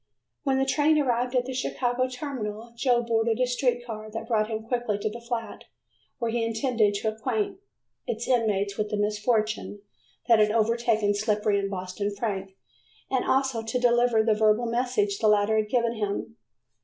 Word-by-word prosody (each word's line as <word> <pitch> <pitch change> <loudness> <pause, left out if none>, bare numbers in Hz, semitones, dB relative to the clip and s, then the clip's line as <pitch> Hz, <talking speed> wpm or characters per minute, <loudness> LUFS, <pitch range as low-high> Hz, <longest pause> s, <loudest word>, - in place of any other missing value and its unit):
When 270 -2 +1
the 270 - +2
train 300 +3 +3
arrived 250 -3 0
at 250 -1 +2
the 260 - -5
Chicago 255 0 -1
terminal, 240 -4 -5
Joe 240 0 +2
boarded 225 0 +1
a 255 - +4
street 245 -1 0
car 215 -2 -7
that 225 +1 -6
brought 215 -2 +1
him 220 -1 -3
quickly 235 -3 -1
to 210 +1 -2
the 235 +2 -8
flat 235 -1 -5 0.5
where 235 -3 -1
he 235 0 0
intended 225 -2 +1
to 220 +2 0
acquaint 390 - -2 0.5
its 230 +1 -3
inmates 210 -5 +1
with 210 0 0
the 210 - -2
misfortune 210 0 -1 0.4
that 230 -2 +6
had 210 0 +4
overtaken 225 -1 +2
Slippery 210 0 +1
and 195 0 -2
Boston 195 +2 -4
Frank, 195 -3 -3 0.6
and 260 -2 +1
also 265 -3 +1
to 225 +3 -2
deliver 240 -2 +3
the 220 -1 +3
verbal 215 +2 +3
message 230 -4 0
the 220 - +2
latter 210 +1 +3
had 215 -1 0
given 235 -1 +1
him. 215 +1 -3
225 Hz, 175 wpm, -26 LUFS, 210-245 Hz, 0.6 s, that